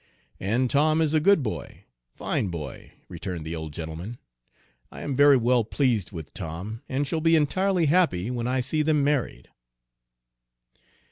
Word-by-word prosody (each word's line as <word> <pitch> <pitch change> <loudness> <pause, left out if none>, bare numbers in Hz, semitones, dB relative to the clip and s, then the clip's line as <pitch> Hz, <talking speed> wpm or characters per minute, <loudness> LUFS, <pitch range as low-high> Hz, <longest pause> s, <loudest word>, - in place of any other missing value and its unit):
"And 115 +7 +1
Tom 155 +4 +3
is 160 -1 +1
a 155 - +4
good 195 -1 +4
boy 110 - -6
a - - -45
fine - - -1
boy," 80 -6 -7
returned 85 -4 -6
the 80 +1 -4
old 80 -1 -6
gentleman. 80 +9 -6 0.7
"I - - -9
am 140 - -3
very 145 0 +6
well 120 0 +3
pleased 115 - 0
with 80 -5 -8
Tom, 90 +6 -6
and 135 +2 0
shall 160 +3 -2
be 165 +1 +4
entirely 180 +4 +2
happy 145 - +2
when 120 -1 -2
I 130 +1 +1
see 150 +5 0
them 150 -1 +2
married." 140 - -1
125 Hz, 160 wpm, -26 LUFS, 90-150 Hz, 0.7 s, very